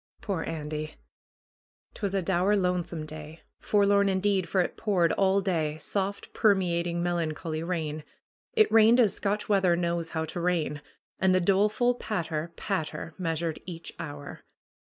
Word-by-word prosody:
Poor 195 -6 -2
Andy! 155 -1 -4 1.0
'Twas 200 -2 -3
a 190 - +1
dour 190 +3 +2
lonesome 175 -4 -1
day. 155 +1 -10 0.2
Forlorn 200 -1 +3
indeed, 190 -2 +1
for 190 - +1
it - - -2
poured 185 -6 +2
all 195 0 +3
day, 160 -6 -1
soft, 200 +4 -3
permeating, 175 -4 +2
melancholy 165 -2 -2
rain. 160 -3 -3 0.5
It 435 -2 +4
rained 225 +2 +6
as 220 -5 +4
Scotch 205 +1 -2
weather 190 -4 +3
knows 170 -1 -1
how 160 - 0
to 160 +2 -6
rain. 170 -4 0 0.4
And 190 -1 +4
the - - +4
doleful 210 +6 +3
patter, 170 -8 -3
patter 160 -5 -3
measured 165 -2 -2
each 165 -2 -7
hour. 145 -3 -7
175 Hz, 140 wpm, -28 LUFS, 160-200 Hz, 1.0 s, rained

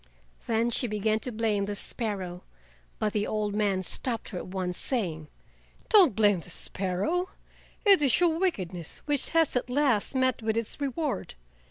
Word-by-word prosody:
Then 230 +1 +1
she 245 - +1
began 215 0 0
to 250 - -5
blame 215 -3 0
the 205 0 -4
sparrow, 195 -5 -3 0.6
but 210 -1 -1
the 210 -1 0
old 210 -1 -1
man 200 -3 +1
stopped 230 +5 -4
her 180 - -5
at - - -8
once, 185 -1 -3
saying: 170 - -2 0.6
"Don't 375 - +6
blame 205 -4 +4
the - - -12
sparrow, 200 - 0 0.6
it 395 -5 +7
is 270 -5 +3
your 335 -2 +2
wickedness 185 - -3
which 290 -2 0
has 325 -4 +2
at 250 - -1
last 260 -3 +1
met 260 -2 +1
with 220 0 -1
its 230 +5 -3
reward. 280 - -2
220 Hz, 165 wpm, -28 LUFS, 200-265 Hz, 0.6 s, it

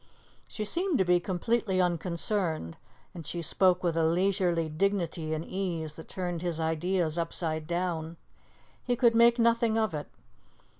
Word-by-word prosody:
She 215 - -4
seemed 350 - +2
to 190 - +2
be 175 0 +4
completely 190 +2 -1
unconcerned, 170 - -1 0.4
and 170 -3 -8
she 170 +3 -4
spoke 185 +2 +4
with 170 -2 0
a 165 - +2
leisurely 175 0 +1
dignity 170 -1 -1
and 160 +1 -5
ease 170 -5 -2
that 160 - -11
turned 175 -3 -4
his 175 -2 -2
ideas 160 +1 0
upside 160 -2 -2
down. 170 -2 -3 0.7
He 245 - 0
could 235 -1 +4
make 235 +1 +5
nothing 230 -1 +2
of 220 -5 0
it. 150 -1 -5
175 Hz, 150 wpm, -28 LUFS, 165-200 Hz, 0.7 s, make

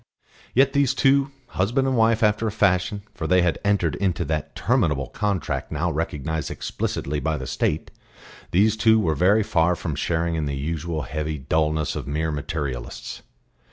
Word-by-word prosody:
Yet 135 +2 +4
these 140 -3 +2
two, 135 0 +3 0.2
husband 120 +8 +1
and 130 - +1
wife 115 0 +3
after 105 +1 +2
a - - -1
fashion 100 -1 +1
for 80 - -4
they 90 0 +4
had 85 -2 +1
entered 100 -6 +2
into 90 -3 0
that 75 0 -3
terminable 70 -3 +1
contract 100 -5 -2
now 80 +3 0
recognised 80 0 -2
explicitly 75 +1 -3
by 75 +2 -1
the 65 - -5
State 75 +3 -1 0.6
these 105 +4 +3
two 110 0 +4
were 80 -7 +1
very 95 +8 +3
far 90 -3 +2
from 80 -2 -4
sharing 85 +3 -1
in 80 -2 -1
the 70 -1 -3
usual 80 +2 -3
heavy 75 +1 -3
dulness 75 +2 0
of - - -5
mere 80 +2 -1
materialists. 70 -4 -5
85 Hz, 165 wpm, -24 LUFS, 75-105 Hz, 0.6 s, Yet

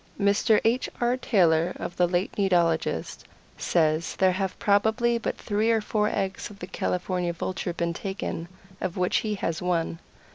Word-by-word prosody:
Mr. 205 +2 +4
H. 240 +3 +2
R. 240 +1 +2
Taylor, 175 -8 +2
of 175 - -6
the 180 - +4
late 180 +2 0
Nidologist, 170 - +1 0.4
says 160 -1 +1
there 190 -1 +4
have 190 0 -2
probably 220 +4 +2
but - - -3
three 215 +1 0
or 225 -1 +4
four 210 0 0
eggs 190 -1 -2
of 205 - -12
the 180 - -6
California 180 -1 -2
Vulture 175 +1 -3
been 170 0 -1
taken, 190 -3 -4 0.3
of 185 +1 -3
which 180 0 +2
he 215 -1 -1
has 165 -4 -2
one. 170 -2 -1
185 Hz, 160 wpm, -26 LUFS, 170-210 Hz, 0.4 s, Mr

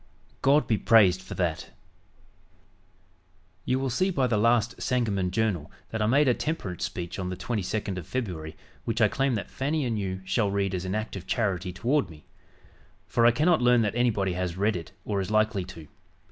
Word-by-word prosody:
God 145 +3 +4
be 110 -3 +1
praised 95 -5 +5
for 95 - -8
that." 85 -4 -2 2.0
"You 130 - +1
will 135 -1 -1
see 185 +11 +1
by 140 -8 +1
the 120 -3 +1
last 115 +2 +2
Sangamon 105 -7 0
Journal 95 -5 -1 0.2
that 115 - -2
I 105 - +2
made 140 +5 +4
a 125 - +5
temperance 115 - -3
speech 90 +1 -5
on 90 -1 -3
the 90 - -3
22d 100 -1 -2
of 85 - -10
February, 85 -11 -4 0.3
which 115 0 -2
I 110 - +6
claim 135 +2 0
that 100 - -5
Fanny 145 +2 -1
and 115 -3 -1
you 95 -1 -3
shall 105 +1 +1
read 100 -1 0
as 90 0 -3
an 95 +2 -2
act 110 -1 -3
of 95 -1 -8
charity 95 -6 -1
toward 125 +9 0
me; 75 -2 -14 0.8
for 115 0 +3
I - - +7
cannot 155 +4 +3
learn 120 -1 +5
that 105 - 0
anybody 105 -6 +1
has 90 -1 -3
read 105 +2 +1
it 85 -2 -6
or 100 -2 -1
is 95 - -4
likely 110 -3 +1
to. 85 -4 -11
105 Hz, 195 wpm, -27 LUFS, 95-120 Hz, 2.0 s, I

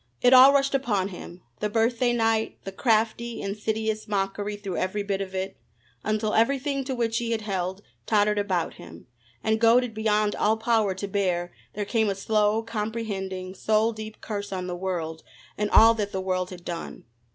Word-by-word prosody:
It 250 - +5
all 260 +2 +10
rushed 275 -1 +2
upon 210 -8 0
him 180 -1 -10 0.2
the 210 - -1
birthday 230 +3 +2
night 225 -2 +1
the 195 - -6
crafty, 230 +2 0
insidious 215 +2 -2
mockery 205 0 -2
through 200 -3 -5
every 195 +2 -1
bit 200 -1 -2
of 190 -1 -5
it, 190 +1 -3 0.5
until 215 0 0
everything 275 +4 +1
to 260 - -2
which 230 -1 0
he 235 -1 -1
had 220 - -2
held 190 -1 -3 0.2
tottered 210 -1 +3
about 185 -5 -1
him, 85 0 -13 0.4
and 220 0 +1
goaded 235 +1 +4
beyond 215 -1 +1
all 220 +1 +2
power 220 -4 +1
to 200 +2 -4
bear 180 -3 -1 0.2
there 205 0 -2
came 220 0 +1
a 195 - -1
slow, 215 +2 +1
comprehending, 210 -4 -4
soul 220 +3 +1
deep 215 0 -9
curse 205 -2 -5
on 185 -1 -3
the 180 -1 -4
world 175 -3 -3 0.3
and 210 0 -1
all 225 +2 +7
that 210 -3 -3
the 190 - -2
world 185 -1 -1
had 180 -2 -11
done. 170 -1 -6
210 Hz, 180 wpm, -26 LUFS, 190-225 Hz, 0.5 s, all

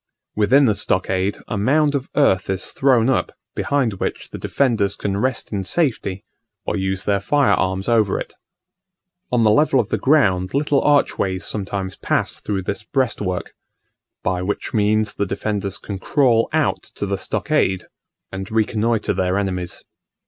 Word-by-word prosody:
Within 130 +7 +4
the 110 - +3
stockade 95 0 0
a 105 - -2
mound 145 +7 +3
of 140 -2 -2
earth 95 -12 +3
is 95 -1 -2
thrown 130 -4 +3
up, 130 - +1 0.2
behind 135 -6 0
which - - -4
the - - -7
defenders 115 -7 +1
can 100 -1 -2
rest 130 +5 -1
in 100 -2 -1
safety, 110 - -1 0.4
or - - -1
use 95 -1 -2
their 100 -1 +2
fire 140 +7 +2
arms 95 +1 0
over 110 -4 +2
it. - - -7 1.0
On 120 -2 +3
the 110 - +5
level 135 +3 +4
of 115 -3 0
the - - -1
ground 95 -10 +2
little 145 -1 +2
archways 100 -10 +1
sometimes 95 -2 -4
pass - - -1
through 100 -3 -3
this 100 +3 -3
breastwork, 105 -8 -2 0.7
by 90 -1 0
which 95 +3 -3
means 110 0 +2
the 100 - -2
defenders 100 0 -2
can 100 -5 -6
crawl 120 0 +2
out - - +1
to - - -6
the 100 -1 -2
stockade 95 -1 0 0.5
and 95 0 -5
reconnoitre 110 0 +1
their 95 +1 0
enemies. 90 -3 -3
105 Hz, 155 wpm, -21 LUFS, 95-125 Hz, 1.0 s, the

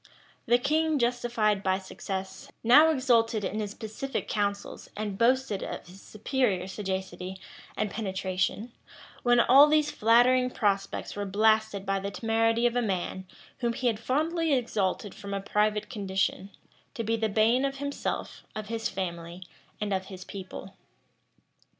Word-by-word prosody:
[] - - -29
The 240 +1 +5
king, 310 +4 +1
justified 235 -4 +1
by 190 -1 +1
success, 190 0 -6
now 290 +8 +7
exulted 235 -7 +2
in 215 - -2
his 210 -1 -4
pacific 225 +5 -4
counsels, 200 -1 -3
and 210 -2 -3
boasted 235 -1 +2
of - - -6
his 185 +2 -14
superior 215 -5 -1
sagacity 190 -1 -5 0.4
and 215 -1 -1
penetration; 190 +2 -2 0.5
when 245 0 +4
all 270 +5 +8
these 300 0 +2
flattering 245 +3 +4
prospects 200 -5 -1
were 205 0 -3
blasted 215 0 +2
by 195 0 0
the 200 +1 -4
temerity 225 +2 +1
of 240 0 +2
a 245 - +2
man 190 -3 -3 0.3
whom 235 -2 0
he 255 - -5
had 225 -3 +2
fondly 315 +6 0
exalted 205 -5 -1
from 200 0 -6
a - - -1
private 210 +1 0
condition, 195 -3 -2 0.5
to 230 - -3
be 225 +1 0
the 220 -1 0
bane 225 +5 +3
of 275 0 -1
himself, 285 +1 -4
of 215 -1 -6
his 225 -1 -2
family, 175 -1 -5 0.4
and 210 -1 -1
of 190 0 -1
his 185 -1 -9
people. 190 0 -8
215 Hz, 150 wpm, -28 LUFS, 195-245 Hz, 0.5 s, all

